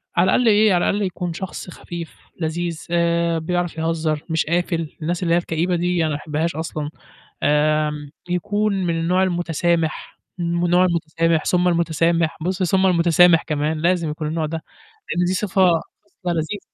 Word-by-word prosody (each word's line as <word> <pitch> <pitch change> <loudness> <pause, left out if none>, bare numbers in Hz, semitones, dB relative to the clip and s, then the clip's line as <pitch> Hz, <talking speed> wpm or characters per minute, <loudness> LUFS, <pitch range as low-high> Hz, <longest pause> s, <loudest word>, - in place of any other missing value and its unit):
على 175 - +4
الأقل 240 +5 +3
إيه 210 -1 +5
على 175 - +2
الأقل 205 0 0
يكون 180 -2 -4
شخص 185 0 -6
خفيف، 170 -1 -8 0.2
لذيذ، 165 +1 -3
آآ، 170 -1 +1
بيعرف 175 0 -2
يهزّر 160 -2 -1
مش 160 0 +1
قافل، 170 -1 -1
الناس 175 +3 -2
اللي 170 -1 +2
هي - - +5
الكئيبة 175 +1 0
دي 175 0 0
أنا 160 - +1
ما 145 - -1
باحبهاش 155 +2 -2
أصلًا، 155 -2 -4 0.5
آمم، 150 0 +1 0.2
يكون 205 +4 0
من 165 -1 0
النوع 180 +3 +2
المتسامح، 170 -2 -1 0.2
من 170 0 -1
النوع 180 +1 +4
المتسامح، 165 -1 0
ثم 180 0 +2
المتسامح، 165 -1 +1
بُصّ، 185 +2 -1
ثم 190 +2 +2
المتسامح 170 -1 +5
كمان، 155 0 -1
لازم 170 -2 +1
يكون 150 0 -4
النوع 160 0 -1
ده، 160 +1 -5 0.5
لإن 175 0 +2
دي 185 - 0
صفة 190 -2 +2 0.4
خصلة 180 -3 -5
لذيذة. 165 +5 -2
170 Hz, 165 wpm, -21 LUFS, 160-180 Hz, 0.5 s, إيه